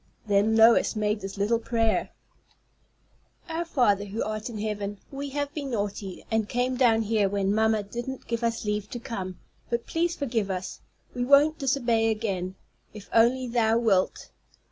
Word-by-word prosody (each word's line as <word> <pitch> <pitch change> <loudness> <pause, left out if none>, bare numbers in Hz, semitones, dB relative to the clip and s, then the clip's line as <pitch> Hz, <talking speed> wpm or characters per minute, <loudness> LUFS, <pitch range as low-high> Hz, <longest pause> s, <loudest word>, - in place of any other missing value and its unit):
Then 205 +1 +3
Lois 225 +1 +5
made 210 0 0
this 195 +1 -6
little 215 +3 +1
prayer: 225 -1 0 1.4
"Our 330 0 -2
Father 240 - +2
who 205 +3 -3
art 215 +2 -4
in 230 - -6
heaven. 205 -1 -3
We 280 +1 -5
have 285 +1 -3
been 290 -4 -4
naughty, 205 -4 -4
and 220 -2 0
came 250 +1 0
down 230 -3 +3
here 210 -2 +1
when 200 0 0
mamma 220 0 +2
didn't 240 +6 -6
give 235 0 -3
us 230 -1 -1
leave 210 0 -2
to 240 - -5
come; 195 -7 -5 0.3
but 235 0 -1
please 340 +1 0
forgive 230 - -1
us. 185 -1 -4 0.3
We 245 - -2
won't 285 +4 +5
disobey 240 -5 +1
again, 195 -4 -2 0.4
if 205 -2 -11
only 245 +3 +4
Thou 230 -2 +2
wilt. 205 -6 +1
225 Hz, 165 wpm, -26 LUFS, 205-245 Hz, 1.4 s, Lois